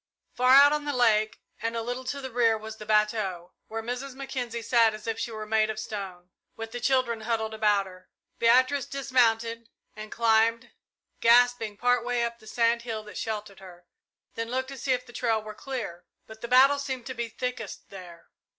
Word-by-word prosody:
Far 255 Hz, +1 st, +5 dB
out 285 Hz, +1 st, +8 dB
on 300 Hz, -1 st, -2 dB
the 290 Hz, -, -2 dB
lake 215 Hz, -3 st, +2 dB, 0.2 s
and 230 Hz, +1 st, -2 dB
a 230 Hz, -, -2 dB
little 245 Hz, +2 st, -5 dB
to 280 Hz, +2 st, -4 dB
the 265 Hz, -1 st, -6 dB
rear 230 Hz, -2 st, +3 dB
was 220 Hz, 0 st, -9 dB
the 215 Hz, -, -10 dB
bateau, 210 Hz, -5 st, 0 dB
where 225 Hz, 0 st, -5 dB
Mrs. 250 Hz, +3 st, -5 dB
Mackenzie 245 Hz, -4 st, -5 dB
sat 230 Hz, -2 st, +3 dB
as 215 Hz, -, -11 dB
if 225 Hz, -1 st, -3 dB
she 235 Hz, -, -2 dB
were 215 Hz, -1 st, -6 dB
made 215 Hz, 0 st, +2 dB
of 220 Hz, -, -4 dB
stone, 185 Hz, -4 st, -7 dB, 0.2 s
with 225 Hz, 0 st, -7 dB
the 245 Hz, -, -5 dB
children 240 Hz, -3 st, +1 dB
huddled 220 Hz, -1 st, -2 dB
about 210 Hz, -2 st, +2 dB
her. 185 Hz, -1 st, -14 dB, 0.3 s
Beatrice 255 Hz, +3 st, +3 dB
dismounted, 230 Hz, -4 st, 0 dB, 0.3 s
and 215 Hz, 0 st, -9 dB
climbed, 230 Hz, +1 st, +2 dB, 0.5 s
gasping, 235 Hz, -2 st, +4 dB
part 245 Hz, 0 st, +2 dB
way 245 Hz, -1 st, 0 dB
up 235 Hz, 0 st, -3 dB
the 220 Hz, -, -17 dB
sand 235 Hz, +1 st, +1 dB
hill 225 Hz, -2 st, -5 dB
that 210 Hz, -, -10 dB
sheltered 210 Hz, -3 st, -5 dB
her, 180 Hz, -2 st, -14 dB, 0.5 s
then 230 Hz, 0 st, -4 dB
looked 260 Hz, +1 st, -2 dB
to 275 Hz, -, -8 dB
see 270 Hz, -, -1 dB
if 250 Hz, 0 st, -3 dB
the 240 Hz, -, -15 dB
trail 230 Hz, -3 st, 0 dB
were 215 Hz, 0 st, -8 dB
clear, 215 Hz, -8 st, -6 dB, 0.2 s
but 220 Hz, 0 st, -13 dB
the 235 Hz, -, -5 dB
battle 270 Hz, +3 st, +5 dB
seemed 265 Hz, -4 st, -4 dB
to 260 Hz, -, -5 dB
be 235 Hz, -1 st, -4 dB
thickest 250 Hz, -2 st, -6 dB
there. 175 Hz, -3 st, -12 dB
230 Hz, 200 wpm, -27 LUFS, 215-250 Hz, 0.5 s, out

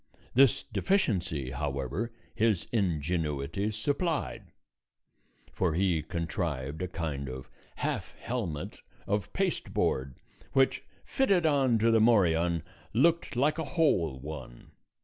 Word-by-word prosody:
This 135 Hz, +1 st, +5 dB
deficiency, 90 Hz, -, 0 dB
however, 70 Hz, -, -2 dB, 0.2 s
his 110 Hz, -5 st, +2 dB
ingenuity 85 Hz, -, 0 dB
supplied, 120 Hz, -, -2 dB, 1.0 s
for 85 Hz, -4 st, 0 dB
he 90 Hz, -3 st, +2 dB
contrived 80 Hz, -3 st, -3 dB
a 90 Hz, -, -1 dB
kind 75 Hz, -7 st, -4 dB
of 65 Hz, 0 st, -8 dB, 0.2 s
half -, -, -3 dB
helmet 95 Hz, -12 st, -4 dB, 0.3 s
of 105 Hz, 0 st, -1 dB
pasteboard 70 Hz, -, -1 dB, 0.4 s
which, 135 Hz, -1 st, +3 dB, 0.2 s
fitted 195 Hz, -11 st, +2 dB
on 135 Hz, -6 st, +3 dB
to 115 Hz, +1 st, +3 dB
the 110 Hz, -1 st, +5 dB
morion, 85 Hz, -7 st, +3 dB, 0.3 s
looked 160 Hz, +5 st, +2 dB
like 150 Hz, +6 st, +2 dB
a -, -, 0 dB
whole 85 Hz, -, +2 dB
one. 65 Hz, -4 st, -9 dB
90 Hz, 110 wpm, -30 LUFS, 75-120 Hz, 1.0 s, This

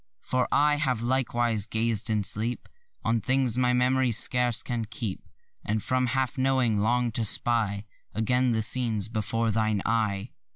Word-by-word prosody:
For 130 Hz, -1 st, -1 dB
I 145 Hz, +1 st, +3 dB
have 130 Hz, -6 st, -1 dB
likewise 120 Hz, -4 st, 0 dB
gazed 110 Hz, 0 st, 0 dB
in 105 Hz, -2 st, 0 dB
sleep 110 Hz, +5 st, -2 dB, 0.4 s
On 115 Hz, 0 st, +1 dB
things 130 Hz, -2 st, +1 dB
my 125 Hz, 0 st, +2 dB
mem'ry 125 Hz, 0 st, +2 dB
scarce 120 Hz, +1 st, +2 dB
can 120 Hz, -3 st, -3 dB
keep. 110 Hz, -3 st, -5 dB, 0.4 s
And 105 Hz, 0 st, -2 dB
from 130 Hz, 0 st, 0 dB
half 130 Hz, +1 st, -2 dB
knowing 130 Hz, -5 st, +1 dB
long 120 Hz, +3 st, +1 dB
to 115 Hz, +1 st, -2 dB
spy 105 Hz, -2 st, 0 dB, 0.3 s
Again 125 Hz, +3 st, +1 dB
the 110 Hz, -1 st, 0 dB
scenes 110 Hz, -3 st, +2 dB
before 115 Hz, +1 st, -1 dB
thine 110 Hz, -2 st, 0 dB
eye. 110 Hz, -2 st, -1 dB
115 Hz, 155 wpm, -26 LUFS, 110-125 Hz, 0.4 s, I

